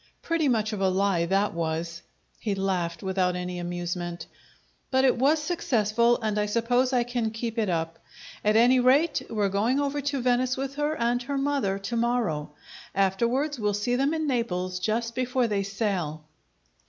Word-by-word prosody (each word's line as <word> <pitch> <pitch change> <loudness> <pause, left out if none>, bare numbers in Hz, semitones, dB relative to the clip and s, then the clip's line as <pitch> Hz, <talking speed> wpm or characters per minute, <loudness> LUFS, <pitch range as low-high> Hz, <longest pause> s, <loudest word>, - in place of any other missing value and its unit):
Pretty 330 -3 +1
much 220 -3 +1
of 200 - -3
a 190 - +3
lie 185 -3 +1
that 195 +3 +1
was!" 165 +1 -3 0.4
He 205 -3 -2
laighed, 180 -4 -2
without 185 -1 0
any 180 0 -4
amusement. 175 0 -4 0.6
"But 260 0 +3
it 260 - +4
was 275 +6 +3
successful, 235 - +1
and 210 -1 0
I 210 - +1
suppose 245 +4 +1
I 250 -2 +2
can 240 -2 -2
keep 225 +1 -4
it 215 -3 +1
up. 165 -1 -2 0.4
At 210 +1 +3
any 245 +3 +5
rate 280 +6 +3
we're 210 -3 +1
going 220 +8 +1
over 285 0 -1
to 285 0 -1
Venice 255 +1 +2
with 270 0 -3
her 295 +1 0
and 240 +1 +1
her 280 +3 -3
mother 275 -8 0
to 195 +4 -4
morrow. 230 -11 0 0.5
Afterwards, 235 +9 +1
we'll 210 -2 0
see 225 +4 0
them 275 +5 +1
in 315 -1 -1
Naples 185 -9 -1
just 230 +4 -1
before 255 0 0
they 205 -3 0
sail." 195 -7 -2
225 Hz, 175 wpm, -26 LUFS, 190-255 Hz, 0.6 s, any